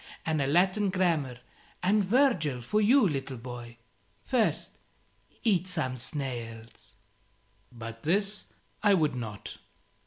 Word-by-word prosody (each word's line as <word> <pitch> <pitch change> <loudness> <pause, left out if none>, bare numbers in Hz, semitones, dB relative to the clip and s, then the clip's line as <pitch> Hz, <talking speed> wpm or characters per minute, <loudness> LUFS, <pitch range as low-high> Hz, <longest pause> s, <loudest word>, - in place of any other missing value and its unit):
And 155 -2 +1
a 135 - +1
Latin 185 +6 +3
Grammar 165 -9 +1 0.5
and 205 +3 +4
Virgil 185 - +2
for 210 - +1
you, 235 +2 +5
little 135 -4 -3
boy. 120 -1 -8 0.5
First, 245 -4 0 0.6
eat 190 -5 +2
some 155 -8 -1
snails." 115 -5 -6 0.8
But 115 -1 -8
this 200 - 0 0.4
I 205 -2 +5
would 155 -6 +2
not. 110 -5 -6
155 Hz, 115 wpm, -29 LUFS, 120-195 Hz, 0.8 s, you